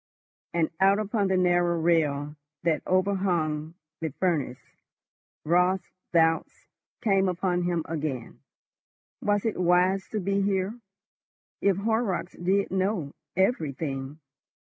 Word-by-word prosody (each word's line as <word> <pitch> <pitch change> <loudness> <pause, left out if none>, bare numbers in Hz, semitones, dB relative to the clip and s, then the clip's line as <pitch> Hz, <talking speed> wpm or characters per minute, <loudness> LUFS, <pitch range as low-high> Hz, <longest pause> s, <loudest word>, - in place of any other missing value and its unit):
And 165 -2 +1
out 195 +1 +5
upon 210 -1 0
the 190 -1 +2
narrow 175 -1 +2
rail 150 -3 +1 0.3
that 160 -3 +1
overhung 175 -5 0 0.2
the 160 -1 -2
furnace, 145 -5 -1 0.9
Raut's 180 +3 +2 0.2
doubts 165 -1 +2 0.4
came 195 -4 +3
upon 180 0 0
him 170 -2 0
again. 145 -7 -4 0.8
Was 205 0 +1
it 220 -4 -1
wise 180 +2 +3
to 215 - -2
be 200 +1 0
here? 195 0 0 0.9
If 200 -2 +3
Horrocks 215 -3 -1
did 195 +3 0
know—everything! 160 - -1
180 Hz, 105 wpm, -27 LUFS, 160-195 Hz, 0.9 s, out